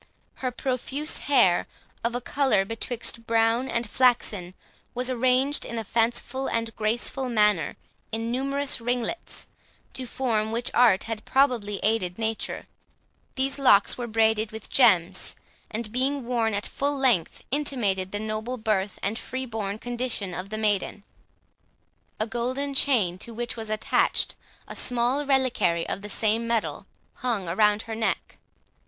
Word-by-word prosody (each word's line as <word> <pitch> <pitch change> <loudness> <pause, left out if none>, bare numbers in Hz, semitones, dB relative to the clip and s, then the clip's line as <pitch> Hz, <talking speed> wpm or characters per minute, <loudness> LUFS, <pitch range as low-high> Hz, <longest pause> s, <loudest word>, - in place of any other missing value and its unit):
Her 255 - 0
profuse 265 +4 -2
hair, 235 -11 +4 0.4
of 235 +1 0
a 245 - -2
colour 265 -6 +2
betwixt 230 +1 -3
brown 230 +3 +2
and 235 -1 -1
flaxen, 210 -7 +2 0.4
was 250 +1 0
arranged 255 +3 +2
in 235 - -5
a 225 - -2
fanciful 240 +4 -1
and 230 -1 -2
graceful 240 +4 0
manner 210 -7 +2 0.4
in 225 +1 -2
numerous 275 +1 0
ringlets, 245 +7 -2 0.5
to 255 -1 -4
form 220 -4 0
which 235 +2 -1
art 230 -6 +5
had 225 -1 -5
probably 240 -7 +2
aided 200 -5 +1
nature. 225 -1 -2 0.7
These 270 +1 0
locks 205 -7 +5
were 240 -1 -4
braided 220 -1 +2
with 220 -1 -8
gems, 185 -10 +4 0.3
and, 220 0 -4
being 265 +2 0
worn 230 -3 +1
at 205 - -2
full 285 +1 -1
length, 245 -11 +1
intimated 220 -10 0
the 205 - -2
noble 220 +3 -3
birth 210 -3 0
and 215 +4 -1
free 260 0 -4
born 215 -4 -3
condition 240 -5 -3
of 180 +3 -5
the 215 - -4
maiden. 205 -1 0 1.2
A 215 - +1
golden 255 +5 -2
chain, 220 -11 +2
to 230 +3 -8
which 240 +1 -3
was 220 -2 -6
attached 215 0 +1 0.3
a - - -8
small 245 +3 +2
reliquary 245 -11 +2
of - - -3
the 210 - -7
same 220 +2 +1
metal, 230 -2 -1 0.3
hung 235 -7 -1
round 210 +5 +3
her 225 - -6
neck. 220 0 -2
230 Hz, 145 wpm, -26 LUFS, 215-255 Hz, 1.2 s, art